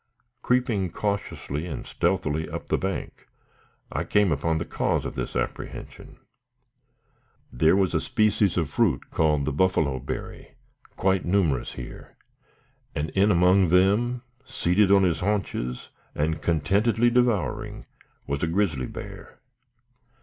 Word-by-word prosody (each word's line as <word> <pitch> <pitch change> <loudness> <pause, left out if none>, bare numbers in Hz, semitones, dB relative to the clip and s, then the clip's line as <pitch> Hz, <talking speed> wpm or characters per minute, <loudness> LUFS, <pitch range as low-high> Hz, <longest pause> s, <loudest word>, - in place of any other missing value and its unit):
Creeping 120 -7 +1
cautiously 90 -5 -3
and 75 -7 -6
stealthily 75 +1 -1
up - - -7
the - - +2
bank, 95 0 -5 0.6
I - - -1
came 105 -4 +2
upon 80 +2 0
the 85 - -3
cause - - -1
of - - -4
this - - -5
apprehension. - - -5 1.4
There 80 +8 +4
was 95 -3 +2
a 80 - +1
species 105 -3 +1
of 85 -4 +1
fruit, - - 0
called 75 -3 +2
the 75 - -1
"buffalo 75 -5 +1
berry," 65 - -7 0.4
quite 95 -1 +1
numerous 85 -8 +1
here, 65 - -10 0.8
and 75 +2 -2
in 100 +2 +3
among 90 0 +4
them, 105 +8 +2 0.2
seated 105 -6 +2
on 100 -1 +6
his 90 -3 +1
haunches, 90 -11 -2 0.3
and 80 +2 -1
contentedly 105 +9 +2
devouring, 120 -7 0 0.4
was 70 0 -3
a 85 - +1
grizzly 80 -8 0
bear. - - -9
90 Hz, 130 wpm, -25 LUFS, 80-100 Hz, 1.4 s, on